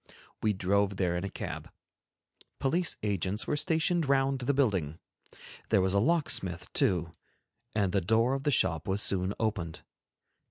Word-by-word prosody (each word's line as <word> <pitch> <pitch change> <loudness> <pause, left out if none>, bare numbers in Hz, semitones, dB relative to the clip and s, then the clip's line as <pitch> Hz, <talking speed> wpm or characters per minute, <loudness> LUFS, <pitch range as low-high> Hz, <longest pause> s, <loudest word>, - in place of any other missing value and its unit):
We 110 -1 +2
drove 100 +1 +1
there 90 -2 +1
in 90 - -2
a 100 - -3
cab. - - -6 0.9
Police 170 +6 0
agents 100 0 -1
were - - 0
stationed 160 +1 +1
round 135 -1 +2
the 130 +3 0
building; 95 - +1 0.7
there - - +4
was 95 0 +1
a 100 - +3
locksmith, 145 - +1
too, 85 -3 +2 0.6
and 100 -4 +1
the 100 - +1
door 115 +7 +2
of 135 - -1
the 145 - 0
shop 80 - +1
was 100 +1 +1
soon 95 +1 0
opened. 100 -8 -2
100 Hz, 155 wpm, -30 LUFS, 95-135 Hz, 0.9 s, there